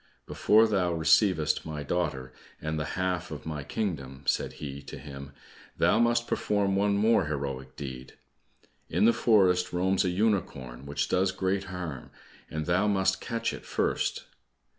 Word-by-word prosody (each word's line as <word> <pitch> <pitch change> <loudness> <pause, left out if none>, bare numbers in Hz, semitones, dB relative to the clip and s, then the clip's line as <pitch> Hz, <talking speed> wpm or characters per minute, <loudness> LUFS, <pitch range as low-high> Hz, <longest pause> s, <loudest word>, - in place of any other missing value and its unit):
"Before 110 +2 +4
thou 95 -5 +1
receivest 80 0 +3
my 75 -2 -5
daughter, 70 -5 -2 0.3
and 80 0 -3
the 75 - -2
half 90 -1 -1
of 75 -2 -8
my 75 -2 -4
kingdom," 70 -7 -4
said - - 0
he 70 -2 -7
to 70 - -9
him, 70 -1 -9 0.5
"thou - - +3
must 120 0 +3
perform 100 -4 0
one 100 +1 +2
more 110 -2 +3
heroic 70 -3 -4
deed. 65 -3 -7 0.8
In 90 +6 +2
the 115 - +6
forest 95 -7 +3
roams 95 +2 +1
a 90 - +1
unicorn 90 - -1
which 70 - -1
does 95 +1 +2
great 95 +1 -1
harm, 90 -8 -6 0.4
and 80 0 -3
thou 90 +4 +2
must 95 -2 +1
catch 115 -2 -2
it - - -8
first." - - -1
90 Hz, 155 wpm, -28 LUFS, 75-100 Hz, 0.8 s, the